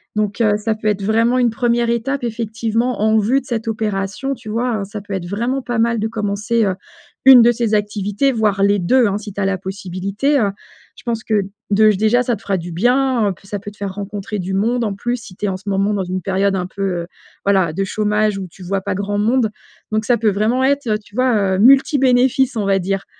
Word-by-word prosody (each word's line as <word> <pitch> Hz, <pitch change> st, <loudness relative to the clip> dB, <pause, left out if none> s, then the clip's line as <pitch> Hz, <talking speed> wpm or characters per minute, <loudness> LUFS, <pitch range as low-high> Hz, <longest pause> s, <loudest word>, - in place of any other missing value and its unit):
Donc 210 Hz, +1 st, -1 dB
heu, 210 Hz, -2 st, +3 dB
ça 215 Hz, +1 st, -1 dB
peut 215 Hz, 0 st, -5 dB
être 205 Hz, -1 st, 0 dB
vraiment 230 Hz, +4 st, +2 dB
une 245 Hz, -2 st, +2 dB
1re 235 Hz, 0 st, +1 dB
étape 245 Hz, +3 st, -2 dB
effectivement 230 Hz, +1 st, -2 dB
en 220 Hz, 0 st, +3 dB
vue 235 Hz, +6 st, +2 dB
de -, -, -21 dB
cette 235 Hz, -3 st, -3 dB
opération, 215 Hz, +3 st, -2 dB
tu 230 Hz, -5 st, -10 dB
vois, 230 Hz, 0 st, -1 dB
heu, -, -, -2 dB
ça 205 Hz, +2 st, -7 dB
peut 200 Hz, 0 st, -8 dB
être 185 Hz, -2 st, -4 dB
vraiment 235 Hz, +8 st, -2 dB
pas 240 Hz, -1 st, -3 dB
mal 230 Hz, 0 st, +1 dB
de 220 Hz, -, 0 dB
commencer, 215 Hz, +1 st, -1 dB
heu, 190 Hz, -, +1 dB, 0.5 s
1 260 Hz, -3 st, +9 dB
de 240 Hz, -, +6 dB
ces 230 Hz, -2 st, 0 dB
activités 205 Hz, +5 st, 0 dB
voire 210 Hz, -5 st, +1 dB
les 200 Hz, 0 st, +3 dB
2 245 Hz, +8 st, +3 dB
hein 200 Hz, 0 st, -1 dB
si 210 Hz, 0 st, -8 dB
tu 200 Hz, -, -6 dB
as 200 Hz, -, +1 dB
la 195 Hz, -2 st, -1 dB
possibilité, 195 Hz, +8 st, -2 dB
heu, 205 Hz, -4 st, +2 dB, 0.5 s
je -, -, -15 dB
pense 230 Hz, -2 st, -3 dB
que 210 Hz, -2 st, +1 dB, 0.3 s
dej 210 Hz, +1 st, +4 dB
déjà 220 Hz, +4 st, +3 dB
ça 240 Hz, -2 st, 0 dB
te -, -, -14 dB
fera 195 Hz, -1 st, -1 dB
du 175 Hz, 0 st, -6 dB
bien, 245 Hz, +2 st, +2 dB
heu, -, -, -2 dB
ça 205 Hz, +1 st, -5 dB
peut 205 Hz, +1 st, -8 dB
te 210 Hz, -, -21 dB
faire 200 Hz, -2 st, -4 dB
rencontrer 205 Hz, +1 st, -5 dB
du 185 Hz, +1 st, -4 dB
monde, 230 Hz, +5 st, +1 dB
en 210 Hz, -3 st, -1 dB
plus, 240 Hz, +5 st, -2 dB
si 205 Hz, -6 st, -12 dB
tu -, -, -3 dB
es -, -, +1 dB
en 185 Hz, -, -2 dB
ce 200 Hz, +2 st, -8 dB
moment 195 Hz, +1 st, +1 dB
dans 200 Hz, -2 st, -1 dB
une 185 Hz, +1 st, -3 dB
période 195 Hz, +2 st, 0 dB
un 180 Hz, -, -2 dB
peu, 195 Hz, -, -9 dB, 0.2 s
heu, -, -, -10 dB, 0.4 s
voilà 190 Hz, -4 st, +3 dB
de 195 Hz, +5 st, -2 dB
chômage 210 Hz, 0 st, 0 dB
où 190 Hz, -2 st, -5 dB
tu 185 Hz, -, -14 dB
vois 195 Hz, +2 st, -2 dB
pas 190 Hz, -, -3 dB
grand 200 Hz, +1 st, -2 dB
monde 225 Hz, +1 st, +2 dB, 0.4 s
donc 215 Hz, 0 st, +1 dB
ça 245 Hz, +1 st, +3 dB
peut 220 Hz, -1 st, +2 dB
vraiment 215 Hz, +6 st, +1 dB
être, 280 Hz, -1 st, +1 dB
heu, 215 Hz, -1 st, +1 dB
tu 205 Hz, -1 st, -20 dB
vois, 220 Hz, -7 st, +2 dB
heu, 185 Hz, -, -2 dB
multi 275 Hz, -, +5 dB
bénéfices, 260 Hz, 0 st, +3 dB
on 210 Hz, -, -1 dB
va 195 Hz, 0 st, +2 dB
dire. 195 Hz, +1 st, -2 dB
215 Hz, 250 wpm, -18 LUFS, 200-235 Hz, 0.5 s, 1